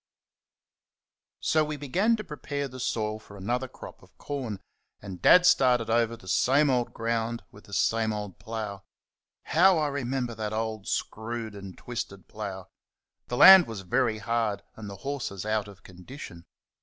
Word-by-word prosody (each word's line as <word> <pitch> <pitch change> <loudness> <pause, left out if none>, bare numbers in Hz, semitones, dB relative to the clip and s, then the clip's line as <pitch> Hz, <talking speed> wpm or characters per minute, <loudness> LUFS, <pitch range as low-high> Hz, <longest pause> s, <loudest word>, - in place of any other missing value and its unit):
So 155 -1 +2
we 150 0 -4
began 185 - +1
to 215 - -6
prepare 145 -3 -4
the 130 0 -10
soil 110 -3 -2
for 100 -1 -14
another 120 +7 -2
crop - - -12
of - - -22
corn, 125 -8 -5 0.4
and 95 -3 -9
Dad 180 0 +7
started 125 -8 +4
over 115 0 +1
the 95 - -16
same 135 - +3
old 125 -2 0
ground 115 0 -2
with 100 - -16
the 100 - -14
same 110 +3 +1
old 105 -3 -6
plough. 110 -3 -5 0.6
How 180 +2 +4
I 150 -2 +1
remember 130 -3 -2
that 110 -1 -4
old, 110 -2 -3
screwed 110 0 -3
and 100 -2 -10
twisted 100 -5 -6
plough! 95 -3 -7 0.6
The 120 - -3
land 190 +2 +10
was 110 -4 -6
very 110 +4 +1
hard, 110 -1 -1
and 105 -2 -8
the 100 - -7
horses 130 -9 -4
out 110 -1 0
of 100 -2 -14
condition. 90 -1 -11
115 Hz, 160 wpm, -27 LUFS, 105-130 Hz, 0.6 s, land